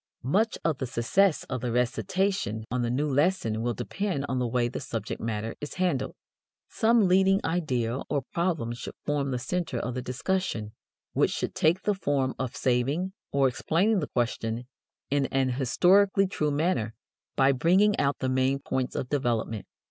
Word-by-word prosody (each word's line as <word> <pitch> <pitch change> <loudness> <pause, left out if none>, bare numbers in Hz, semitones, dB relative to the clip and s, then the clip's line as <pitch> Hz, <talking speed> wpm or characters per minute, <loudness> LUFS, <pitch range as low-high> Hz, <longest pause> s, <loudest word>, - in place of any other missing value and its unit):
Much 205 - +1
of 160 -4 +1
the 130 - -2
success 150 +10 +2
of 130 -2 -4
the 125 -1 -2
recitation 125 - 0
on 125 0 0
the 120 - 0
new 140 +5 0
lesson 140 - +1
will 120 0 -1
depend 190 - -2
on 130 - -1
the 125 - 0
way 120 0 +1
the 120 - -5
subject 120 -5 -5
matter 110 0 -3
is 145 - -6
handled. 175 -8 0 0.5
Some 225 -3 +3
leading 190 +1 +4
idea 130 -8 0
or 140 -2 0
problem 165 -10 0
should 120 - -7
form 145 -1 0
the 125 - -1
center 165 +2 -2
of 120 +1 -3
the 125 - -3
discussion, 125 - -2 0.4
which - - +3
should - - -3
take 170 +4 +2
the 210 - +2
form 140 -8 0
of 130 -2 -3
saving 140 +9 0 0.2
or 140 -1 +3
explaining 180 - +1
the 150 - -2
question 120 -1 -1 0.5
in 140 -1 +2
an 135 -1 +1
historically 190 - +4
true 155 -5 -1
manner 145 -7 0 0.4
by 135 0 +5
bringing 185 +10 +4
out 140 0 +1
the 130 - -2
main 130 +1 +2
points 130 -2 -3
of 125 - -2
development. 120 -6 -1
135 Hz, 170 wpm, -27 LUFS, 125-180 Hz, 0.5 s, by